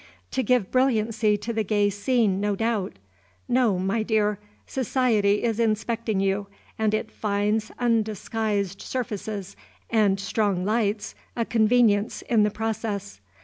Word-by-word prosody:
To 260 - 0
give 250 -6 +1
brilliancy 225 -4 +2
to 215 +3 -4
the 220 -1 0
gay 205 0 +2
scene, 205 -2 +1
no 205 0 0
doubt! 220 - -1 0.5
No, 240 -6 +2
my 195 +4 0
clear! 210 -2 +1 0.3
Society 225 -6 +1
is 230 -1 0
inspecting 220 -1 0
you, 195 +1 0 0.3
and 215 -1 +2
it 215 - -3
finds 210 +1 -1
undisguised 215 -3 -1
surfaces 210 -5 -4 0.4
and 205 -4 +3
strong 195 -2 0
lights 215 -1 0 0.2
a 230 - 0
convenience 220 -2 +2
in 230 -3 +2
the 210 - +4
process. 210 - -4
215 Hz, 130 wpm, -25 LUFS, 205-230 Hz, 0.5 s, the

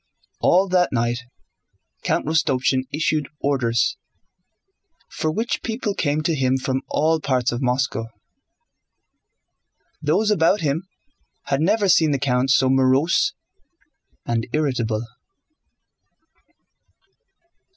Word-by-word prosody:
All 185 +3 +3
that 180 -1 +2
night 120 0 0 0.8
Count - - -1
Rostopchín 130 -4 +1
issued 150 -1 0
orders, 120 -5 0 1.1
for 155 0 -2
which 225 +9 -2
people 225 -2 -3
came 155 -5 -1
to 165 - +1
him 130 -3 +1
from 130 0 -2
all 160 +2 +1
parts 130 -4 0
of 120 +2 -4
Moscow. 125 -3 -1 1.9
Those 215 0 +1
about 185 +1 +3
him 160 +4 -1 0.6
had 140 +1 -1
never 205 +4 +2
seen 165 -3 +4
the 140 - +1
count 130 -1 0
so 135 0 +4
morose 135 - +2 0.9
and 115 -1 -1
irritable. 120 -7 -1
140 Hz, 100 wpm, -22 LUFS, 130-165 Hz, 1.9 s, seen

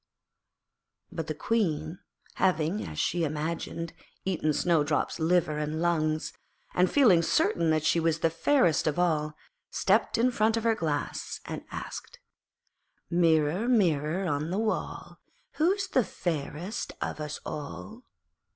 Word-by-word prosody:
But - - -4
the - - -3
Queen, 165 -7 -1 0.4
having, 180 +1 +1
as 75 - -7
she 175 - 0
imagined, 165 +2 -3 0.3
eaten 170 -5 +1
Snowdrop's 150 -1 +1
liver 160 -2 +2
and 150 +1 -2
lungs, 155 -2 0 0.4
and 180 +1 +3
feeling 220 -12 +5
certain 165 0 +2
that 155 -1 +1
she 170 - +3
was 165 -1 +1
the 165 - +2
fairest 170 - +2
of 150 - 0
all, 155 -4 +1 0.3
stepped - - +2
in 245 +2 +3
front 225 -1 +2
of 225 - -2
her 230 -1 +3
Glass, 155 -8 -3
and - - -5
asked - - -7 0.9
'Mirror, 165 +3 +3
Mirror 175 - +2
on 150 0 -1
the 185 - -1
wall, 220 0 -3 0.4
Who 325 +4 +4
is 395 -1 -2
fairest 180 - -2
of - - -3
us 150 0 -4
all?' 210 - -7
165 Hz, 135 wpm, -28 LUFS, 155-195 Hz, 0.9 s, feeling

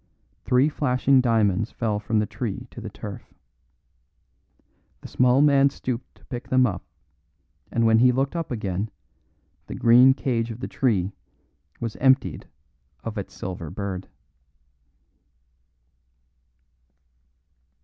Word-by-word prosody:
Three 125 +3 +4
flashing 135 -2 +2
diamonds 110 -3 +2
fell 110 -3 -2
from 110 +1 -1
the 105 - +2
tree 110 +2 -5
to 120 - -9
the 110 - -6
turf. 105 0 -9 1.7
The - - -9
small 125 +2 +3
man 140 -1 +5
stooped 125 -2 -5
to - - -23
pick 120 -2 -7
them 130 0 +4
up, 90 -7 -3 0.9
and 115 -1 +1
when 110 0 +5
he 125 +1 +6
looked 135 +5 -1
up 165 -2 -3
again 105 -3 -3 0.8
the - - -6
green 125 +3 +6
cage 120 -4 -1
of 115 0 -7
the - - -4
tree 100 -8 0 0.7
was 115 -2 -4
emptied 130 0 +2 0.6
of 115 -1 -5
its 100 - -8
silver 90 -4 -6
bird. 95 +1 -5
115 Hz, 120 wpm, -24 LUFS, 105-130 Hz, 1.7 s, he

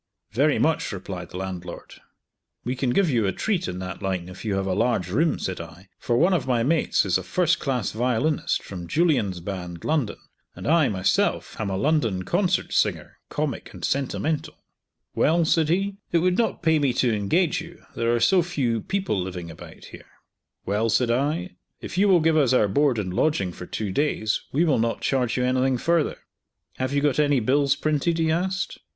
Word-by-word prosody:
"Very 140 +6 +2
much," 160 +1 +1
replied 90 -3 -6
the - - -8
landlord. 90 -2 -6 0.7
"We 125 +2 -1
can 130 0 -1
give 190 +9 +3
you 115 -8 +1
a - - +1
treat 185 - -1
in 90 - -4
that 90 +2 -6
line 95 -2 -2
if 90 - -10
you 105 -3 -1
have 95 0 -1
a 95 - 0
large 90 -5 0
room," 155 - +2
said 95 -2 -4
I, 85 +4 -12
"for 120 - 0
one 180 +7 +4
of 160 -7 0
my 120 -3 +2
mates 155 -2 +2
is 95 -1 +2
a - - -7
first 170 - +1
class 125 -6 -1
violinist 125 +6 0
from 90 -3 -7
Julien's 110 - +1
Band, 90 -2 -6
London, 150 -7 0 0.4
and - - -9
I, 160 -1 +4
myself, 95 -2 0
am 105 - -2
a 95 - -2
London 115 -8 +1
concert 180 - 0
singer, - - 0
comic - - -3
and - - -4
sentimental." 140 +3 -2 0.5
"Well," 165 +2 +3
said 160 -1 +2
he, 195 +3 0
"It 170 - +3
would 180 +2 +2
not 225 -4 0
pay 160 -2 +3
me 140 -4 +1
to 120 -2 +2
engage 160 - +1
you. 170 +1 -12
There 115 0 +1
are - - +1
so 185 +9 +4
few 130 -10 -1
people 190 - -1
living 90 -2 -6
about - - -12
here." - - -12 0.6
"Well," 105 +4 0
said 120 +2 +2
I, 150 +9 -1 0.2
"If - - -7
you 205 - +5
will 180 -3 +5
give 160 0 +3
us 135 -4 +3
our 110 -5 +4
board 140 +4 +2
and 95 -4 -3
lodging 100 - +1
for 90 - -9
two 105 -3 -3
days 110 -3 0
we 160 +6 +2
will 150 -7 +2
not 115 +1 -1
charge 125 -4 0
you 125 - +1
anything 130 0 +2
further." 165 +3 +1 0.6
"Have 130 0 -1
you 140 0 +1
got 145 -1 +1
any 145 -3 +3
bills 140 +4 +2
printed?" 155 +3 0
he 160 -1 +1
asked. 185 +3 -2
130 Hz, 200 wpm, -24 LUFS, 100-160 Hz, 0.7 s, you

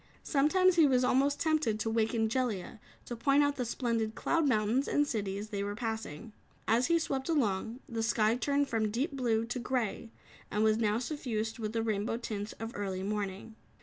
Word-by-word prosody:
Sometimes 350 +6 +3
he 320 -3 +7
was 255 -2 +3
almost 275 +3 +2
tempted 310 -9 +1
to 220 - -2
waken 225 0 +1
Jellia 225 -4 -2 0.3
to 240 - -5
point 275 +5 +3
out 285 0 0
the 250 - -1
splendid 230 -2 -1
cloud 330 -3 +1
mountains 230 +2 +2
and 290 - +2
cities 205 -5 -3
they 200 -2 -2
were 205 0 -3
passing. 220 -3 -5 0.3
As 235 +3 +3
he 335 0 +4
swept 275 -3 -2
along, 235 -4 0
the 230 -2 -3
sky 225 0 +2
turned 280 +3 +1
from 225 -4 0
deep 250 +9 -1
blue 235 -5 0
to 245 +2 -4
grey 235 -3 -2 0.4
and 210 +1 0
was 215 0 +4
now 215 -1 +2
suffused 235 -4 -3
with 215 -1 -3
the 225 -1 0
rainbow 215 0 -1
tints 215 -3 -5
of 225 +1 -6
early 190 -2 -3
morning. 205 +1 -4
230 Hz, 185 wpm, -31 LUFS, 215-265 Hz, 0.4 s, he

